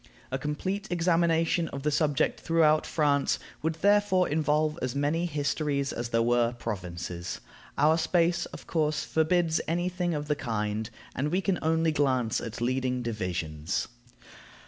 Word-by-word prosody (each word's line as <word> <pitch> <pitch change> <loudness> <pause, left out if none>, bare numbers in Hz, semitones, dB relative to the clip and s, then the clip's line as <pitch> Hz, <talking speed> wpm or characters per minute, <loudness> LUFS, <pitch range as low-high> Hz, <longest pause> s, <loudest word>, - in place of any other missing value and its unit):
A 130 - -1
complete 185 +9 -3
examination 165 -1 +2
of 140 -2 -6
the 150 - +1
subject 145 -2 +1
throughout 155 -2 +3
France 145 -3 +2 0.2
would 160 +2 -1
therefore 205 -3 +4
involve 150 0 +1
as 130 0 -2
many 150 +5 +1
histories 145 -2 -1
as 120 0 -4
there 115 0 +2
were 120 0 +2
provinces. 90 -6 -5 0.4
Our 155 +3 +4
space, 170 0 +2
of - - -11
course, 155 -2 0
forbids 160 +1 +2
any 175 +2 0
thing 180 -2 -1
of 145 0 -4
the 150 - +1
kind, 110 -4 -2 0.3
and 140 +4 0
we 180 - +2
can 195 -2 0
only 160 0 +2
glance 130 -6 +1
at 115 0 -6
leading 125 0 0
divisions. 90 -7 -2
150 Hz, 145 wpm, -28 LUFS, 120-165 Hz, 0.4 s, therefore